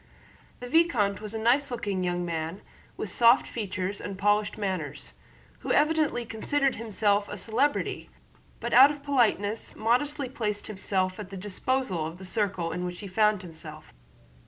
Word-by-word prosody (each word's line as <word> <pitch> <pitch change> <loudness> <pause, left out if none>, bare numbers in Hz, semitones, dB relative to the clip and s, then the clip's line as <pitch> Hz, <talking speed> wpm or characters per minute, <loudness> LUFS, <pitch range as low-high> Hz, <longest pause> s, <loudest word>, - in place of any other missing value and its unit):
The 245 - -5
vicomte 245 - +2
was 215 +1 -5
a - - -2
nice 250 +6 +3
looking 210 -6 -2
young 175 0 -1
man 165 +3 -4 0.3
with 205 - -4
soft 235 +5 +5
features 200 -3 -4
and 195 -2 -6
polished 205 +1 +1
manners, 185 -9 -4 0.5
who - - -4
evidently 300 -5 +2
considered 270 +5 0
himself 210 -2 +1
a 205 - -5
celebrity 235 +9 0 0.5
but - - -3
out 265 +3 +9
of 290 -1 -6
politeness 230 -6 +1
modestly 265 +5 +1
placed 210 -5 -3
himself 190 -2 -2
at 205 -3 -7
the 195 - -7
disposal 200 -2 -1
of 165 +2 -8
the 190 - -9
circle 185 -4 -1
in 180 - -3
which 180 0 -5
he 200 - -6
found 210 0 +2
himself. 160 - -10
210 Hz, 160 wpm, -27 LUFS, 185-240 Hz, 0.5 s, out